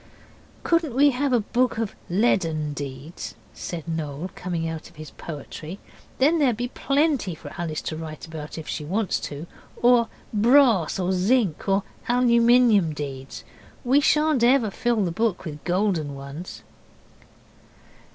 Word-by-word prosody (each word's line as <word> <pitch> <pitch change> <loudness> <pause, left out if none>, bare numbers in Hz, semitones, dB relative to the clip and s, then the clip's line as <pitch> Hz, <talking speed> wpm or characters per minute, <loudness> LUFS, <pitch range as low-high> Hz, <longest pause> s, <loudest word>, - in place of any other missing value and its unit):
'Couldn't 330 -7 +1
we 285 +2 +6
have 275 +2 0
a 245 - +4
book 245 +3 0
of 225 -3 -2 0.2
leaden 165 -7 +1
deeds?' 140 +3 -7 0.2
said 170 -3 -6
Noel, 160 +1 -4
coming 170 -2 -3
out 160 0 -6
of 175 - -23
his 155 0 -9
poetry, 155 +3 -8 0.4
'then 305 +5 +3
there'd 255 -7 +2
be 245 +1 -2
plenty 275 - 0
for - - -10
Alice 160 -3 -3
to 155 - -3
write 155 -1 -7
about 160 -2 -8
if 160 - -7
she 150 - -3
wants 195 +5 -1
to, 145 +2 -6 0.3
or 240 -1 +4 0.3
brass 230 - +4
or 185 -1 0
zinc 195 -1 +1
or 195 0 +2 0.3
aluminium 235 -6 +4
deeds? 135 -2 -6 0.4
We 265 +3 +4
shan't 300 -3 +3
ever 240 -3 +4
fill 230 -1 0
the 175 - -1
book 205 0 -1
with 150 -2 -7
golden 175 -6 0
ones. 140 +5 -8
190 Hz, 145 wpm, -24 LUFS, 160-245 Hz, 0.4 s, we